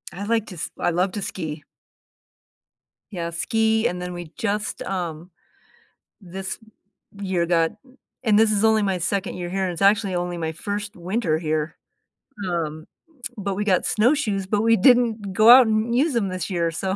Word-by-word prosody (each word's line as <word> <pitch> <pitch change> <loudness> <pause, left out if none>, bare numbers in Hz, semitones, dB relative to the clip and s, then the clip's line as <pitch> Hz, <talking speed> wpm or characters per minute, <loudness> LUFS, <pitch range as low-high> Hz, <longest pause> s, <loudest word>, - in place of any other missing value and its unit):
I 200 - -5
like 225 0 +1
to 185 - -9
s 160 - -5
I - - +1
love 180 +3 +1
to 205 - -4
ski. 155 -4 -5 1.5
Yeah, 170 -3 -4
ski, 220 +6 +1
and 180 0 -4
then 180 0 -5
we 175 -2 -8
just, 210 -1 -2
um 175 -2 -5 0.9
this 190 +2 -6 0.6
year, 185 -3 0
got 165 -1 +2 0.5
and 210 -2 +4
this 220 0 +4
is 210 +1 +1
only 220 -1 +4
my 190 -2 0
2nd 190 +3 -2
year 175 -1 -4
here; 190 0 -1
it's 175 +1 -4
actually 200 -1 +3
only 175 0 -2
my 160 -1 -2
1st 205 +4 -5
winter 180 -2 -1
here 155 -1 -2 0.7
um, 155 -2 -3 0.5
but 200 -1 -3
we 210 - -1
got 185 -4 +2
snowshoes, 215 -5 +1
but 205 +1 +1
we 230 0 +4
didn't 225 -3 +3
go 215 +3 +5
out 250 -1 +9
and 220 +2 0
use 290 +4 +2
them 220 -5 0
this 185 +1 -4
year, 170 -2 0
so, 190 +3 -2
195 Hz, 175 wpm, -23 LUFS, 175-215 Hz, 1.5 s, out